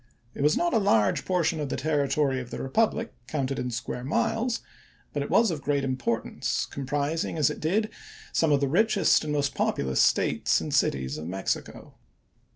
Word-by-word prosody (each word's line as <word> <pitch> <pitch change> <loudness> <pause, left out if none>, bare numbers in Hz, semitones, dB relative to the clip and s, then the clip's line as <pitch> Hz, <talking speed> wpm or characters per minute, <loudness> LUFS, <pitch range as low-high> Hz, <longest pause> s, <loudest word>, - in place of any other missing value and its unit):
It - - -6
was 150 +2 +3
not 345 0 +1
a 225 - +4
large 110 - +2
portion 170 -3 +1
of 145 -2 -3
the - - -2
territory 140 -3 +1
of 125 -2 -7
the - - -6
republic 220 +10 0
counted 135 -3 -2
in 125 - -2
square 125 +1 -4
miles, 225 - 0 0.5
but - - -1
it - - -4
was 225 -4 +4
of 155 -3 -4
great 140 -1 0
importance, 130 -3 -1
comprising, 145 +4 -2
as 150 - +3
it - - -7
did, 210 +8 0 0.4
some 160 -2 +2
of 145 -1 +3
the 140 - +2
richest 200 +6 +3
and 150 - -3
most 140 -2 0
populous 65 -2 0
States - - +2
and - - -5
cities 65 +2 +1
of 80 - -6
Mexico. 95 +2 -4
145 Hz, 180 wpm, -27 LUFS, 130-180 Hz, 0.5 s, a